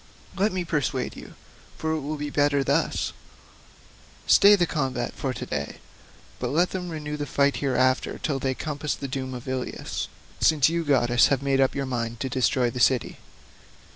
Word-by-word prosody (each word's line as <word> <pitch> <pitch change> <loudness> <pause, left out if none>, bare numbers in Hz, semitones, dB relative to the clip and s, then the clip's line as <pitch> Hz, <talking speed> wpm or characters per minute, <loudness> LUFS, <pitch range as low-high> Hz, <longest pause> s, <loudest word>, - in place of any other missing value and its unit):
Let 200 +3 +2
me 185 -1 -2
persuade 150 -6 -1
you—for 160 - -8
it 160 - 0
will 150 +2 -4
be 145 0 -4
better 145 -1 +2
thus—stay 135 - 0
the 175 -3 +2
combat 135 -6 -2
for 135 - -3
to 125 - -5
day, - - -4 0.6
but 125 - -2
let 165 +8 +2
them 180 -2 -4
renew 150 -2 -5
the 145 0 -4
fight 140 +1 +2
hereafter 130 -1 +1
till 140 -3 -2
they 130 0 -1
compass 150 0 -3
the 140 - -5
doom 130 -1 -4
of 125 - -9
Ilius, 130 -1 -3 0.3
since 155 -3 +4
you 170 0 -1
goddesses 120 -5 +4
have 140 -1 0
made 135 -1 +2
up 135 - +2
your 140 0 -1
minds 120 -2 -3
to 130 - -1
destroy 125 -1 +1
the 125 - -5
city." 125 +1 +2
140 Hz, 170 wpm, -25 LUFS, 130-150 Hz, 0.6 s, since